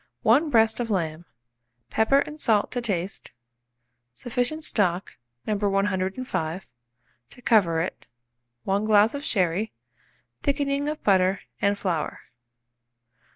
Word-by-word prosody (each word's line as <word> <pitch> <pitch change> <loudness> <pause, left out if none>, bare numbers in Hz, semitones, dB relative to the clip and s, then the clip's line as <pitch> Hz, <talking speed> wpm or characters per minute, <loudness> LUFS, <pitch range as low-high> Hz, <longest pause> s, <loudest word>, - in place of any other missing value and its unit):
1 280 +9 +4
breast 225 -3 +3
of 235 -1 -2
lamb, 170 -4 -2 0.7
pepper 275 +6 +3
and 300 +1 -6
salt 215 -4 +2
to 245 - -2
taste, 195 -5 -3 0.9
sufficient 245 - -2
stock, 185 - 0 0.3
No. 215 - 0
105, 195 -2 -1 0.6
to 250 - -14
cover 175 -8 +3
it, 175 - -5 0.6
1 200 +2 0
glass 215 0 +5
of 285 0 -5
sherry, 190 - 0 0.7
thickening 280 0 0
of 305 0 -5
butter 190 -1 +3 0.2
and 200 0 +2
flour. 175 -6 -2
210 Hz, 110 wpm, -25 LUFS, 185-245 Hz, 0.9 s, glass